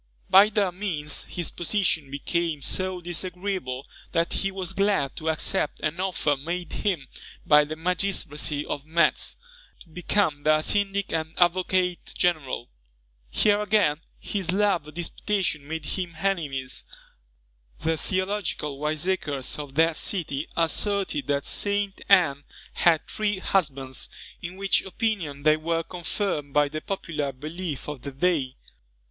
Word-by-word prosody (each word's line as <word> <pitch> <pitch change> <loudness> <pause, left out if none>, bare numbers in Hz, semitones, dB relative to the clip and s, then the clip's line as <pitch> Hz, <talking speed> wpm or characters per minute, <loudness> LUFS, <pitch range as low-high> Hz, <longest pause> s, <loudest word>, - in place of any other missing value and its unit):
By 200 +3 +9
their 205 -4 +1
means 170 -6 -1
his 175 -2 -3
position 175 -5 0
became 155 +1 -1
so 185 +2 0
disagreeable 175 -6 -3 0.3
that 165 0 +1
he 195 - 0
was 190 -1 -3
glad 195 -8 +1
to 160 - -1
accept 155 -1 +1
an 155 +3 -1
offer 185 -6 +1
made 170 +4 -4
him 175 -10 -1 0.4
by 150 0 +6
the 155 +1 -5
magistracy 160 -4 -1
of 140 - -4
Metz, 165 +2 +2 0.4
to 170 - -15
become 170 -2 0
their 155 +1 +3
syndic 200 0 +1
and 160 0 -2
advocate 180 0 +2
general. 155 -8 0 0.6
Here, 205 - +3
again, 200 -7 +2 0.2
his 195 -4 -2
love 195 -5 +2
of 150 - -11
disputation 175 -3 -1
made 160 -1 -4
him 175 0 -3
enemies: 150 -9 -1 0.9
the 160 0 0
theological 185 -5 -2
wiseacres 150 -3 -1
of 140 -2 -7
that 165 +1 +4
city 155 -6 -1
asserted 180 -1 +1
that 140 -1 0
St. 200 -1 0
Ann 165 -8 +5 0.3
had 165 -3 +3
three 210 -2 -1
husbands, 140 -9 0 0.3
in 180 +1 -6
which 195 -1 +2
opinion 185 -8 -2
they 155 +1 +5
were 165 +1 0
confirmed 175 -4 -3
by 145 -1 +4
the 155 +1 -4
popular 155 -7 -3
belief 155 +3 -5
of 150 -4 -5
the 140 - -5
day. 140 -3 +1
170 Hz, 135 wpm, -26 LUFS, 150-190 Hz, 0.9 s, By